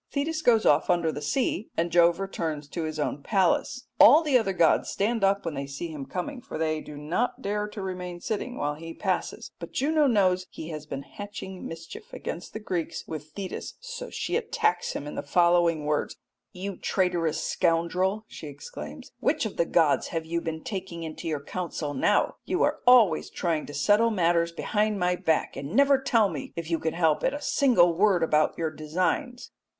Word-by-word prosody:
Thetis 310 Hz, +3 st, -2 dB
goes 230 Hz, -6 st, +4 dB
off 145 Hz, +1 st, +4 dB
under 170 Hz, -2 st, +2 dB
the 145 Hz, -, -6 dB
sea 220 Hz, -, -1 dB
and 170 Hz, +1 st, 0 dB
Jove 170 Hz, 0 st, +5 dB
returns 160 Hz, -6 st, -3 dB
to 165 Hz, +1 st, -3 dB
his 155 Hz, 0 st, -4 dB
own 145 Hz, -1 st, -2 dB
palace. 200 Hz, -, +1 dB
All 310 Hz, +3 st, +9 dB
the 295 Hz, -4 st, +1 dB
other 220 Hz, -6 st, +3 dB
gods 170 Hz, -4 st, +3 dB
stand 220 Hz, +2 st, 0 dB
up 195 Hz, 0 st, +2 dB
when 165 Hz, -, -2 dB
they 140 Hz, -1 st, -4 dB
see 140 Hz, +5 st, -5 dB
him 150 Hz, -4 st, -7 dB
coming, 245 Hz, +9 st, -4 dB
for -, -, -7 dB
they 155 Hz, -1 st, 0 dB
do 150 Hz, -, -10 dB
not 170 Hz, +12 st, -2 dB
dare 210 Hz, +1 st, -1 dB
to 210 Hz, -1 st, -7 dB
remain 180 Hz, -2 st, -5 dB
sitting 225 Hz, +6 st, -3 dB
while 145 Hz, 0 st, -1 dB
he 165 Hz, +2 st, -9 dB
passes, -, -, -2 dB
but -, -, -8 dB
Juno 300 Hz, +1 st, +2 dB
knows 185 Hz, -6 st, +2 dB
he 160 Hz, -, -8 dB
has 155 Hz, -2 st, -7 dB
been 135 Hz, -1 st, -5 dB
hatching 195 Hz, -1 st, -8 dB
mischief 165 Hz, 0 st, -10 dB
against 170 Hz, -, -6 dB
the 220 Hz, -, -4 dB
Greeks 175 Hz, -6 st, -3 dB
with 155 Hz, -1 st, -7 dB
Thetis, 195 Hz, -2 st, -5 dB
so -, -, -7 dB
she -, -, -3 dB
attacks 455 Hz, -1 st, 0 dB
him -, -, -5 dB
in 150 Hz, -, -6 dB
the -, -, -3 dB
following 170 Hz, 0 st, +3 dB
words: 150 Hz, 0 st, -1 dB, 0.4 s
"You 190 Hz, +1 st, -6 dB
traitorous 175 Hz, -4 st, 0 dB
scoundrel," 180 Hz, +5 st, +1 dB
she 155 Hz, -, -9 dB
exclaims, -, -, -9 dB
"which 305 Hz, -, +1 dB
of 220 Hz, -, -5 dB
the 170 Hz, -, +2 dB
gods 160 Hz, -4 st, +2 dB
have 165 Hz, -1 st, -3 dB
you 170 Hz, +1 st, -2 dB
been 160 Hz, -1 st, -5 dB
taking 185 Hz, -4 st, -5 dB
into 160 Hz, +1 st, -6 dB
your 150 Hz, -3 st, -2 dB
counsel 165 Hz, -3 st, -4 dB
now? 130 Hz, -, +2 dB
You -, -, 0 dB
are -, -, +1 dB
always 225 Hz, -10 st, +6 dB
trying 165 Hz, -4 st, -2 dB
to 145 Hz, -, -8 dB
settle 205 Hz, +11 st, +4 dB
matters 170 Hz, -4 st, +2 dB
behind 210 Hz, +4 st, 0 dB
my 180 Hz, 0 st, +2 dB
back, 160 Hz, -2 st, 0 dB
and 140 Hz, +7 st, -5 dB
never 275 Hz, 0 st, +5 dB
tell 230 Hz, -5 st, +3 dB
me, 155 Hz, -7 st, -6 dB
if 170 Hz, 0 st, -5 dB
you 165 Hz, -, +1 dB
can 160 Hz, -, -2 dB
help 160 Hz, -3 st, +2 dB
it, 265 Hz, -, +1 dB
a -, -, -4 dB
single 200 Hz, -11 st, +4 dB
word 185 Hz, -1 st, +3 dB
about 155 Hz, -1 st, +2 dB
your 160 Hz, -1 st, -1 dB
designs." 185 Hz, -, -2 dB
175 Hz, 195 wpm, -27 LUFS, 160-210 Hz, 0.4 s, All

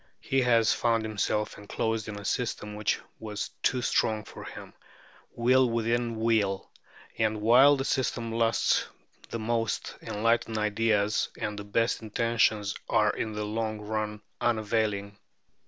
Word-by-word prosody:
He 135 Hz, 0 st, +1 dB
has 115 Hz, -3 st, +4 dB
found 115 Hz, -2 st, +1 dB
himself 105 Hz, 0 st, -1 dB
enclosed 110 Hz, +1 st, -2 dB
in 105 Hz, -1 st, -5 dB
a 100 Hz, -, -10 dB
system 105 Hz, -4 st, -2 dB
which 105 Hz, 0 st, 0 dB, 0.2 s
was 105 Hz, -2 st, -4 dB
too 125 Hz, -2 st, +1 dB
strong 110 Hz, -2 st, +1 dB
for -, -, -10 dB
him, -, -, -9 dB, 0.6 s
wheel 125 Hz, +2 st, +4 dB
within 115 Hz, 0 st, 0 dB
wheel; 110 Hz, -4 st, +1 dB, 0.5 s
and 110 Hz, -1 st, +1 dB
while 125 Hz, +7 st, +6 dB
the 135 Hz, -, -2 dB
system 120 Hz, -4 st, -1 dB
lasts 115 Hz, 0 st, +2 dB, 0.4 s
the -, -, -3 dB
most 115 Hz, 0 st, -2 dB
enlightened 115 Hz, +1 st, 0 dB
ideas 105 Hz, 0 st, +1 dB
and 105 Hz, 0 st, -3 dB
the -, -, -5 dB
best 115 Hz, +4 st, 0 dB
intentions 110 Hz, -2 st, +1 dB, 0.2 s
are -, -, +3 dB
in 110 Hz, -, -3 dB
the 105 Hz, 0 st, -3 dB
long 110 Hz, 0 st, -2 dB
run 105 Hz, 0 st, -3 dB, 0.2 s
unavailing." 105 Hz, -3 st, 0 dB
110 Hz, 140 wpm, -28 LUFS, 105-115 Hz, 0.6 s, while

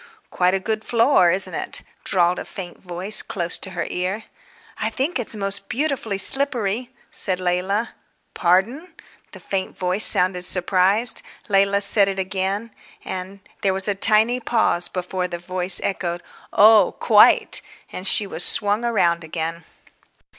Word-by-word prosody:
"Quite 180 Hz, +1 st, +1 dB
a -, -, -1 dB
good 215 Hz, +3 st, -3 dB
floor, 230 Hz, -6 st, +3 dB
isn't 185 Hz, +3 st, +2 dB
it?" -, -, -5 dB, 0.2 s
drawled 180 Hz, -1 st, +1 dB
a -, -, -7 dB
faint 180 Hz, -3 st, -9 dB
voice 185 Hz, +4 st, 0 dB
close 175 Hz, -3 st, -2 dB
to 190 Hz, -, -5 dB
her 170 Hz, -, -2 dB
ear. 185 Hz, +5 st, -3 dB, 0.6 s
"I -, -, -1 dB
think 275 Hz, +3 st, -2 dB
it's 230 Hz, -2 st, -3 dB
most 195 Hz, -1 st, -3 dB
beautifully 260 Hz, -7 st, -2 dB
slippery," 245 Hz, -1 st, 0 dB, 0.2 s
said 185 Hz, -2 st, 0 dB
Leila. 185 Hz, +5 st, -2 dB, 0.4 s
"Pardon!" 235 Hz, -, 0 dB, 0.4 s
The -, -, -12 dB
faint 190 Hz, -1 st, -4 dB
voice 185 Hz, +3 st, +1 dB
sounded 180 Hz, 0 st, +1 dB
surprised. 190 Hz, +5 st, +1 dB, 0.3 s
Leila 200 Hz, 0 st, +2 dB
said 200 Hz, 0 st, +4 dB
it 195 Hz, -1 st, -3 dB
again. 195 Hz, +3 st, -3 dB, 0.3 s
And 190 Hz, +1 st, -7 dB, 0.2 s
there 190 Hz, -1 st, 0 dB
was 190 Hz, +1 st, +1 dB
a 205 Hz, -, +1 dB
tiny 220 Hz, +5 st, +3 dB
pause 220 Hz, -8 st, +1 dB
before 180 Hz, 0 st, -4 dB
the 175 Hz, -1 st, -6 dB
voice 180 Hz, +1 st, -3 dB
echoed, 175 Hz, -3 st, -3 dB, 0.3 s
"Oh, 210 Hz, -2 st, +5 dB
quite!" 210 Hz, -2 st, +4 dB, 0.3 s
and 185 Hz, -, -3 dB
she 210 Hz, -, +4 dB
was 175 Hz, -3 st, 0 dB
swung 205 Hz, +1 st, +5 dB
round 170 Hz, -8 st, +1 dB
again. 165 Hz, +1 st, -5 dB
195 Hz, 145 wpm, -21 LUFS, 180-215 Hz, 0.6 s, Oh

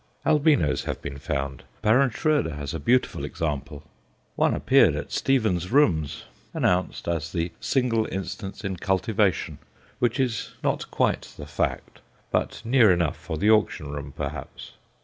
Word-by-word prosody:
Albinos 145 Hz, -, +3 dB
have -, -, -3 dB
been 70 Hz, 0 st, -7 dB
found; 70 Hz, -3 st, -3 dB, 0.2 s
Baron 125 Hz, +6 st, +4 dB
Schroeder 145 Hz, -, 0 dB
has 70 Hz, -2 st, -5 dB
a 80 Hz, -, -3 dB
beautiful 125 Hz, -, +1 dB
example. 75 Hz, -2 st, -4 dB, 0.5 s
One -, -, +2 dB
appeared -, -, +4 dB
at -, -, -5 dB
Stevens' 110 Hz, -10 st, +1 dB
Rooms, 90 Hz, -, +2 dB, 0.3 s
announced 90 Hz, 0 st, 0 dB
as 85 Hz, -2 st, -2 dB
the 85 Hz, -1 st, -2 dB
single 120 Hz, -4 st, +1 dB
instance 95 Hz, +3 st, -5 dB
in 95 Hz, -2 st, -3 dB
cultivation 95 Hz, 0 st, 0 dB, 0.4 s
which 120 Hz, 0 st, +1 dB
is 125 Hz, -4 st, -1 dB
not -, -, -1 dB
quite -, -, 0 dB
the 75 Hz, -, -7 dB
fact, 75 Hz, -, -3 dB, 0.3 s
but -, -, -1 dB
near 115 Hz, -4 st, +5 dB
enough 85 Hz, -3 st, +1 dB
for 80 Hz, -, -6 dB
the 105 Hz, +7 st, +3 dB
auction 105 Hz, -9 st, +1 dB
room, 70 Hz, -1 st, -6 dB
perhaps. -, -, -6 dB
95 Hz, 145 wpm, -25 LUFS, 75-115 Hz, 0.5 s, near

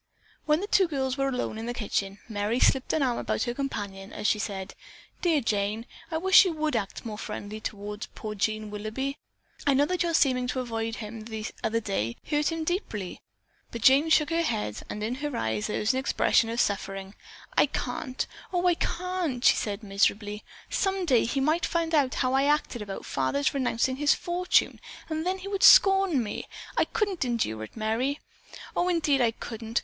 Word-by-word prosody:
When 300 Hz, +3 st, +3 dB
the -, -, -2 dB
two 385 Hz, -3 st, +4 dB
girls 265 Hz, -4 st, -1 dB
were 275 Hz, 0 st, 0 dB
alone 250 Hz, -4 st, -3 dB
in 225 Hz, -, -5 dB
the 240 Hz, -, -3 dB
kitchen, 200 Hz, -3 st, -2 dB
Merry 215 Hz, +2 st, -1 dB
slipped 265 Hz, 0 st, +3 dB
an 315 Hz, -, +1 dB
arm 245 Hz, -3 st, 0 dB
about -, -, -1 dB
her 240 Hz, -, -2 dB
companion 205 Hz, -8 st, -5 dB
as -, -, -7 dB
she 210 Hz, -, +3 dB
said, 195 Hz, -2 st, -4 dB, 0.5 s
"Dear 325 Hz, -5 st, +3 dB
Jane, 215 Hz, 0 st, -1 dB, 0.2 s
I 320 Hz, -, -1 dB
wish 380 Hz, +3 st, +7 dB
you 365 Hz, -3 st, 0 dB
would 310 Hz, -3 st, -1 dB
act 215 Hz, +2 st, -3 dB
more 215 Hz, -2 st, -5 dB
friendly 210 Hz, -1 st, -6 dB
toward 210 Hz, 0 st, -5 dB
poor 215 Hz, -1 st, -5 dB
Jean 215 Hz, +1 st, -1 dB
Willoughby. 220 Hz, +7 st, -4 dB, 0.5 s
I 280 Hz, -, +5 dB
know 285 Hz, +2 st, +4 dB
that 365 Hz, +3 st, -1 dB
your 340 Hz, -2 st, +1 dB
seeming 255 Hz, -4 st, +3 dB
to 255 Hz, -, -2 dB
avoid 225 Hz, -2 st, -3 dB
him 220 Hz, -1 st, -7 dB
the 220 Hz, -1 st, -5 dB, 0.2 s
other 225 Hz, +1 st, +1 dB
day, 155 Hz, -, -2 dB
hurt 295 Hz, +1 st, +1 dB
him 325 Hz, 0 st, -2 dB
deeply." 270 Hz, -, -3 dB, 0.5 s
But 235 Hz, -, -7 dB
Jane 280 Hz, +5 st, +6 dB
shook 305 Hz, -1 st, +4 dB
her 335 Hz, +1 st, +2 dB
head 105 Hz, -, -2 dB
and 210 Hz, -, -4 dB
in 225 Hz, +3 st, -1 dB
her 295 Hz, -4 st, -2 dB
eyes 110 Hz, -1 st, -1 dB
there -, -, -2 dB
was 220 Hz, +5 st, +1 dB
an 260 Hz, -, 0 dB
expression 230 Hz, -3 st, +2 dB
of 230 Hz, +1 st, -2 dB
suffering. 195 Hz, -2 st, -1 dB, 0.4 s
"I -, -, +5 dB
can't! 255 Hz, -2 st, -3 dB, 0.3 s
Oh, 360 Hz, -1 st, 0 dB
I 355 Hz, -, +5 dB
can't!" 345 Hz, -7 st, -2 dB
she -, -, +7 dB
said 205 Hz, +1 st, -3 dB
miserably. 205 Hz, +1 st, 0 dB, 0.3 s
"Some 385 Hz, -1 st, 0 dB
day 255 Hz, -8 st, +4 dB
he 245 Hz, +4 st, -1 dB
might 310 Hz, +5 st, +2 dB
find 335 Hz, -1 st, 0 dB
out 280 Hz, -4 st, +3 dB
how 255 Hz, -1 st, +1 dB
I 270 Hz, -, +4 dB
had 290 Hz, +2 st, +5 dB
acted 245 Hz, -5 st, -6 dB
about 200 Hz, -2 st, -6 dB
father's 135 Hz, +1 st, 0 dB
renouncing 260 Hz, -1 st, 0 dB
his 295 Hz, +1 st, +4 dB
fortune, 355 Hz, +1 st, +1 dB, 0.3 s
and 315 Hz, +2 st, -2 dB
then 375 Hz, +1 st, 0 dB
he 380 Hz, +1 st, -8 dB
would 395 Hz, -1 st, -2 dB
scorn 390 Hz, -, +7 dB
me! 210 Hz, -, -5 dB, 0.3 s
I -, -, +3 dB
couldn't 400 Hz, -7 st, -1 dB
endure 225 Hz, -, -1 dB
it, 110 Hz, -, -17 dB
Merry. 230 Hz, +6 st, 0 dB, 0.6 s
Oh, 355 Hz, -, +2 dB
indeed, 310 Hz, -6 st, +2 dB
I 235 Hz, -, +4 dB
couldn't! 225 Hz, 0 st, -4 dB
250 Hz, 200 wpm, -27 LUFS, 210-310 Hz, 0.6 s, wish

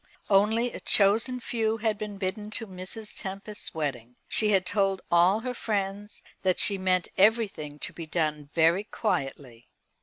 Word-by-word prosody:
Only 220 Hz, +5 st, +3 dB
a -, -, -6 dB
chosen 220 Hz, +5 st, +4 dB
few 225 Hz, -2 st, -1 dB
had 215 Hz, -1 st, -1 dB
been 210 Hz, -2 st, -5 dB
bidden 195 Hz, +2 st, -3 dB
to 225 Hz, -, -5 dB
Mrs. 195 Hz, +3 st, -8 dB
Tempest's 200 Hz, +1 st, -6 dB
wedding. 125 Hz, -6 st, -4 dB
She 215 Hz, -, +2 dB
had 190 Hz, -3 st, +3 dB
told 195 Hz, -1 st, 0 dB
all 180 Hz, +5 st, +4 dB
her 250 Hz, +1 st, -3 dB
friends 205 Hz, -2 st, -3 dB, 0.2 s
that 185 Hz, -1 st, +1 dB
she 200 Hz, -2 st, +3 dB
meant 185 Hz, -1 st, +1 dB
everything 195 Hz, -8 st, +2 dB
to -, -, -5 dB
be 165 Hz, -2 st, -8 dB
done 150 Hz, -3 st, -2 dB
very 170 Hz, +5 st, +3 dB
quietly. 135 Hz, -, -3 dB
195 Hz, 155 wpm, -27 LUFS, 170-215 Hz, 0.2 s, chosen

